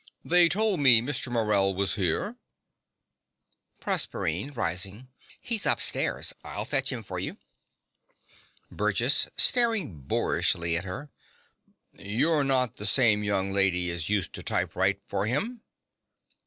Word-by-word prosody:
They 175 0 +4
told 210 -2 +1
me 130 -5 +6
Mr. 125 +1 -3
Morell 105 -4 +1
was 100 +1 0
here. 90 -6 -1 1.5
PROSERPINE 90 - -1
(rising). 100 +3 -3 0.3
He's 225 -3 +2
upstairs. - - +1
I'll - - -5
fetch - - +1
him - - -6
for - - -6
you. - - -5 1.3
BURGESS - - +2
(staring 225 - +2
boorishly 85 +5 0
at 85 +2 -3
her). 130 +10 -8 0.8
You're 140 +10 0
not 130 -3 +1
the 105 - -4
same 105 -1 +3
young 100 -1 -1
lady 90 -3 +2
as 85 -1 -4
used 105 -4 -2
to - - -8
typewrite 95 +2 -1
for 100 +1 -2
him? 220 - -2
105 Hz, 120 wpm, -26 LUFS, 95-140 Hz, 1.5 s, me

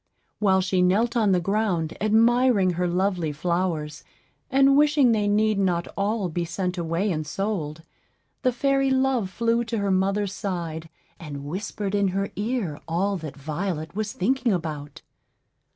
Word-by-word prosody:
While 190 -2 +3
she 185 0 +1
knelt 210 +7 +2
on 215 -4 +3
the 180 - +3
ground 180 -4 -1
admiring 225 -2 +4
her 180 +1 -1
lovely 180 -2 0
flowers, 165 -1 -2 0.5
and 275 0 +5
wishing 290 -3 +4
they 210 -2 +1
need 210 0 +2
not 175 -3 0
all 200 0 0
be 175 +1 -2
sent 180 +2 -3
away 170 +3 -1
and 155 -2 -2
sold, 160 -2 -3 0.6
the 255 - +2
fairy 275 +2 +1
Love 260 -6 +1
flew 230 +3 +1
to 230 0 -3
her 200 -1 0
mother's 195 +1 +1
side, 170 -6 -4 0.3
and 145 -5 -7
whispered 195 +4 -4
in 200 -1 +2
her 195 +2 -2
ear 205 - -2
all 190 +5 0
that 155 -4 -8
Violet 160 +3 -4
was 215 0 -2
thinking 245 +5 0
about. 155 -5 -4
195 Hz, 150 wpm, -25 LUFS, 170-220 Hz, 0.6 s, and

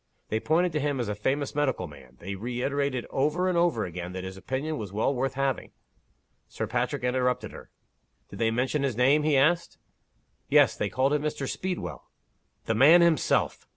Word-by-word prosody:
They 110 - 0
pointed 170 +7 +1
to 155 - -1
him 145 -2 -1
as 120 - -2
a - - -1
famous 135 +8 -1
medical 145 -10 0
man. 65 -5 -14
They 95 +3 -6
reiterated 125 +4 -2
over 155 +7 +1
and 185 - +1
over 170 -10 +2
again, 90 0 -6
that 95 0 -5
his 95 0 -6
opinion 135 +9 -3
was 100 -3 -6
well 110 +7 0
worth 135 +1 -2
having 135 -2 -2 0.4
" - - -45 0.3
Sir 110 - -4
Patrick 125 +4 -2
interrupted 125 0 0
her. - - -12 0.6
"Did - - -9
they 115 -1 +2
mention 130 +5 0
his 135 -5 -1
name?" 135 +5 +4
he 150 -2 +2
asked. 165 +5 +2 0.7
"Yes. - - +5
They - - -2
called 135 +2 +1
him 150 - +1
Mr. 145 -2 -3
Speedwell." 185 +4 -5 0.6
"The 115 - 0
man 150 +10 +7
himself! 170 -2 +1
135 Hz, 190 wpm, -27 LUFS, 115-150 Hz, 0.7 s, man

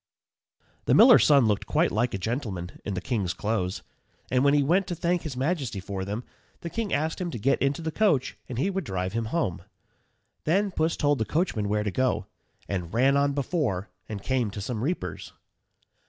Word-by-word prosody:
_ - - -41 0.2
The - - +4
miller's 240 +2 +8
son 140 -5 +6
looked 105 -2 0
quite - - +2
like 115 0 0
a - - -1
gentleman 100 -5 -4
in 100 - -3
the 90 - -3
king's 95 -4 -1
clothes, 100 -4 -2 0.5
and 125 0 +3
when 140 +1 +5
he 145 - +4
went 180 +7 +2
to 175 - -3
thank 175 +1 0
his 145 -5 -6
majesty 135 - -1
for 95 0 -4
them, 105 +5 -4 0.4
the 170 - -6
king 230 -3 -2
asked 160 +4 -1
him 180 - -2
to 140 - -5
get 130 +6 +1
into 140 +4 0
the 160 - -2
coach 165 - +1
and 125 - -5
he 185 +10 +1
would 195 0 -2
drive 95 -6 -3
him 115 0 -1
home. 110 - -1 0.8
Then 195 +5 +2
Puss 160 -1 0
told 145 -2 +2
the 110 - 0
coachman 110 - 0
where 105 0 +1
to 105 - -2
go, 125 -3 0 0.4
and 90 -4 -3
ran 130 +5 +3
on 140 0 +2
before 135 - -1 0.2
and 100 -3 -5
came 130 -4 0
to 100 - -7
some 110 +2 -3
reapers. 175 +6 -3
130 Hz, 205 wpm, -27 LUFS, 105-160 Hz, 0.8 s, miller's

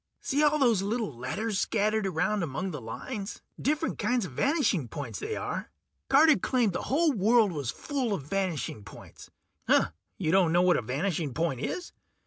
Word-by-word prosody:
See 285 +2 0
all 300 0 +4
those 235 -9 +3
little 210 - -2
letters 190 - -2
scattered 215 -1 +1
around 190 +4 0
among 165 +4 -3
the 150 -5 -6
lines? 195 - -6 0.2
Different 305 +3 0
kinds 245 -4 +1
of 170 - -8
vanishing 225 - +1
points, 115 -4 -6
they - - -3
are. - - -4 0.4
Carter 300 +2 +6
claimed 240 -7 +1
the - - -2
whole 310 +4 +3
world 220 -2 +3
was 145 -7 -3
full 265 - -2
of 150 - -6
vanishing 165 - -2
points. - - -13 0.9
You 160 -5 0
don't 185 -3 +4
know 175 +1 +4
what 180 -1 +4
a - - 0
vanishing 145 - -2
point 160 -6 0
is? 350 - -4
195 Hz, 170 wpm, -28 LUFS, 155-245 Hz, 0.9 s, Carter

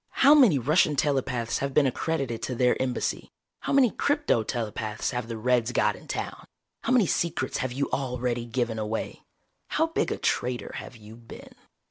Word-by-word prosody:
How 285 - +9
many 250 - +6
Russian 150 +4 +3
telepaths 130 -5 0
have 140 -1 -3
been 150 - +5
accredited 135 -3 -2
to 125 - -3
their 125 +1 +3
Embassy? 130 -1 -2 0.3
How - - -4
many 270 -5 +5
crypto 290 - +1
telepaths 110 -1 -3
have 125 -3 -3
the 115 -1 -5
Reds 120 +1 +1
got - - +2
in - - -15
town? - - -5 0.3
How - - -2
many 250 -5 +5
secrets 170 0 -1
have 130 -2 -2
you 140 +3 -1
already 125 -3 -2
given 115 -1 -2
away? 110 +1 -4 0.5
How 320 - +1
big 325 - -1
a - - -2
traitor 125 0 -1
have - - -8
you 110 0 -13
been?" 115 0 -13
125 Hz, 175 wpm, -26 LUFS, 115-150 Hz, 0.5 s, How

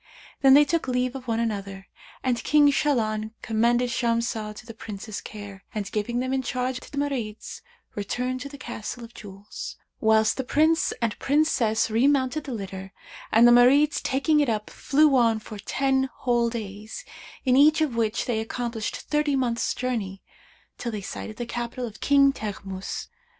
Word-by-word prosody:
Then 270 -1 +7
they 295 +1 +7
took 330 -1 -1
leave 250 0 0
of 260 -2 -8
one 225 -1 0
another 200 -4 -3 0.4
and 250 -2 0
King 295 -1 +5
Shahlan 220 -7 0
commended 240 +2 +2
Shamsah 230 -3 -1
to - - -11
the 230 - -9
Prince's 215 -1 -7
care, 200 -2 -9
and 205 -2 -3
giving 220 +3 -2
them 255 +1 -1
in 265 - +1
charge 255 0 -2
to - - -14
the 285 - -8
Marids, 255 -7 -3 0.3
returned 250 +5 -3
to 280 - -6
the 285 - -10
Castle 240 -1 -6
of 230 0 -11
Jewels, 200 0 -9 0.2
whilst 220 -1 +3
the 265 - -1
Prince 315 +5 +2
and 225 -2 -1
Princess 255 -7 +2
remounted 270 +4 +2
the 275 - -5
litter, 195 -3 -6 0.4
and 230 +2 +7
the - - +7
Marids 270 +5 +5
taking 300 +3 +2
it 290 -4 +2
up, 215 -2 -2
flew 290 0 +3
on 230 -3 +4
for 215 -1 -9
ten 265 +4 0
whole 240 -2 +2
days, 215 - -7 0.4
in 255 -1 +4
each 305 +3 +6
of 300 -6 0
which 225 -1 0
they 235 -3 0
accomplished 230 0 -4
thirty 300 -1 0
months' 240 -3 0
journey, 215 -7 -3 0.6
till 240 - -3
they 210 -2 -4
sighted 215 +2 -7
the 240 - -3
capital 240 +1 -4
of 225 -2 -10
King 275 -1 +5
Teghmus. 195 -5 -5
240 Hz, 170 wpm, -25 LUFS, 215-270 Hz, 0.6 s, Then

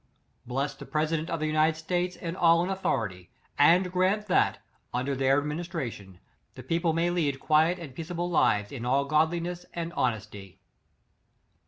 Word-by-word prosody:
Bless 135 +3 -1
the - - -11
president 155 +1 -1
of 165 - -2
the 155 - -1
United 155 +1 +2
States, 180 +2 -2
and 170 0 -5
all 170 -1 +4
in 185 - -2
authority; 100 - -2 0.3
and 175 +5 +5
grant 190 +3 +1
that, 185 - +2 0.4
under 135 +3 -1
their 135 +1 +3
ad - - -6
ministration, 150 - -5 0.4
the - - -9
people 165 0 0
may 165 +2 +1
lead 150 -6 0
quiet 160 +5 +3
and 160 -7 -9
peaceable 170 +4 -4
lives 105 -11 +2
in 125 -4 -6
all 135 +3 +2
godliness 170 +4 0
and 170 0 -4
honesty. 105 -5 -3
160 Hz, 160 wpm, -28 LUFS, 135-175 Hz, 0.4 s, and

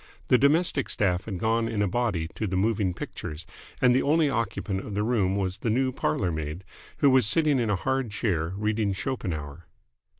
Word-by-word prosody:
The 125 - +6
domestic 145 0 +2
staff 90 -2 0
had 100 -5 -4
gone 115 +4 +1
in 105 -2 0
a - - +1
body 95 -6 -1
to 110 - -3
the 95 - -2
moving 100 -1 +1
pictures, 80 -2 -7 0.3
and 125 -1 +5
the 130 - +3
only 150 0 +2
occupant 110 -4 -2
of 105 - -6
the 105 - 0
room 105 -5 +1
was 95 -2 -2
the 115 - -1
new 130 +4 +1
parlourmaid, 80 -3 -2 0.3
who 140 - +4
was 130 -5 +4
sitting 150 +1 +3
in 115 -3 0
a 105 - +2
hard 130 +4 -1
chair, 100 -7 -1
reading 105 -1 0
Schopenhauer. 85 - -4
105 Hz, 190 wpm, -26 LUFS, 95-125 Hz, 0.3 s, The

